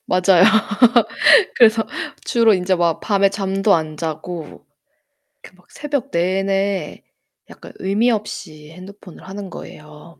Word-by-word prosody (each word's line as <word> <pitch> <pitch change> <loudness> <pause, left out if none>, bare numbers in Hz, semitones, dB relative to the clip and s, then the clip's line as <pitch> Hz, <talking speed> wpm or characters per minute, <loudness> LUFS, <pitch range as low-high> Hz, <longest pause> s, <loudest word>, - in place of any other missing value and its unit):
맞아요. 185 0 +3 1.1
그래서 225 -2 +4 0.4
주로 230 -3 +3
인제 185 0 0
막 170 -2 0
밤에 200 -2 +1
잠도 195 0 0
안 155 -2 -3
자고 160 -1 -7 0.8
이렇게 185 - -15
막 180 - -27
새벽 290 -3 -4
내내 195 0 -2 0.5
약간 - - -13
의미 210 +6 +1
없이 160 -8 -6
핸드폰을 185 +1 -14
하는 195 0 -8
거예요. 150 0 -13
190 Hz, 240 characters per minute, -19 LUFS, 170-200 Hz, 1.1 s, 그래서